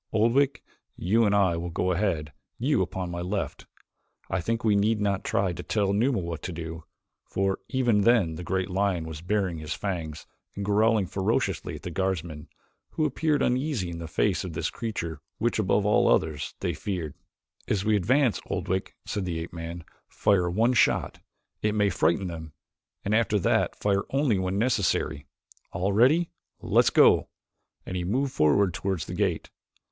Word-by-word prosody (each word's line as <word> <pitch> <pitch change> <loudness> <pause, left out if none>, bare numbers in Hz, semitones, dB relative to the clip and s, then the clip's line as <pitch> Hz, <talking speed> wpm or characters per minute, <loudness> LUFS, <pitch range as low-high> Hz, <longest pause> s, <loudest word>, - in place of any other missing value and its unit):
Oldwick, 120 +6 +2 0.3
you 110 +6 +2
and 100 -1 +3
I 95 -4 +3
will 85 +1 -4
go 90 +2 0
ahead, 85 -6 -1 0.2
you - - +1
upon 90 -2 -3
my 85 0 -4
left. 95 +3 -3 0.6
I 95 -1 0
think 115 +5 -2
we 105 -2 +3
need 105 +2 +2
not 100 -2 0
try 95 -2 0
to 90 - -6
tell 100 +1 0
Numa 120 +5 +2
what 85 -3 -4
to 90 - -5
do," 80 -1 -7 0.4
for 95 0 -1
even 120 -6 +2
then 105 -7 +3
the 90 - -6
great 95 +1 -1
lion 95 -3 0
was 80 -1 -7
baring 95 -2 -1
his 75 +1 -4
fangs 85 -6 -4 0.3
and 100 - -4
growling 105 0 +3
ferociously 95 -3 -1
at 75 - -10
the 90 - -5
guardsmen, 85 -4 -2 0.5
who 155 - +1
appeared 150 0 +1
uneasy 125 - 0
in 85 - -6
the 85 - -6
face 95 +4 +1
of 90 -3 -6
this 80 +1 -2
creature 85 -10 -4 0.2
which, 120 0 0
above 100 0 +2
all 105 - +4
others, 75 -2 +1
they - - 0
feared. 85 -7 -4 0.5
"As 100 -1 0
we 110 0 +3
advance, 125 +5 +2
Oldwick," 95 0 -2
said 100 - -3
the 85 -2 -2
ape 80 +1 -6
man, 85 0 -6 0.2
"fire 90 -4 +2
one 115 +8 +2
shot. - - +2 0.4
It 105 0 0
may 105 -2 +2
frighten 85 +3 +1
them, 80 -3 -7 0.5
and 100 - 0
after 110 -1 +3
that 95 - +1
fire 100 -1 0
only 135 -7 +2
when 95 +1 -1
necessary. 100 - 0 0.5
All 95 +3 0
ready? 145 - +4 0.3
Let's - - +3
go!" - - +5 0.6
and 95 - -5
he 90 - -1
moved 130 +9 0
forward 80 +5 +3
toward 95 +1 -2
the 90 - -5
gate. 90 -3 -1
95 Hz, 175 wpm, -27 LUFS, 85-110 Hz, 0.6 s, go